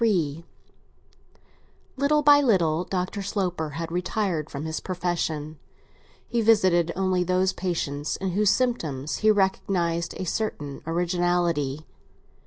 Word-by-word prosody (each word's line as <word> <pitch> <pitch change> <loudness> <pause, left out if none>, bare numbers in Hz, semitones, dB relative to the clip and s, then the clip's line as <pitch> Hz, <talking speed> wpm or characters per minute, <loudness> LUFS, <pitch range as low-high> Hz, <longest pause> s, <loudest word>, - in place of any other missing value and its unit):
XXXIII 170 -8 +1 1.5
LITTLE 290 +2 +2
by 290 0 +7
little 175 - +2
Dr. 185 +2 -3
Sloper 180 -5 -2
had 165 +3 -5
retired 180 -3 -1
from 140 +2 -6
his 160 0 -3
profession; 165 -4 -3 0.7
he 235 -1 0
visited 185 -7 +4
only 185 -1 +1
those 185 +1 +1
patients 150 -5 -2
in 190 -1 -3
whose 205 +2 +2
symptoms 160 - 0
he 215 - +3
recognised 190 -4 +1
a 185 - -4
certain 150 -8 -3
originality. 170 -4 0
180 Hz, 115 wpm, -25 LUFS, 160-195 Hz, 1.5 s, by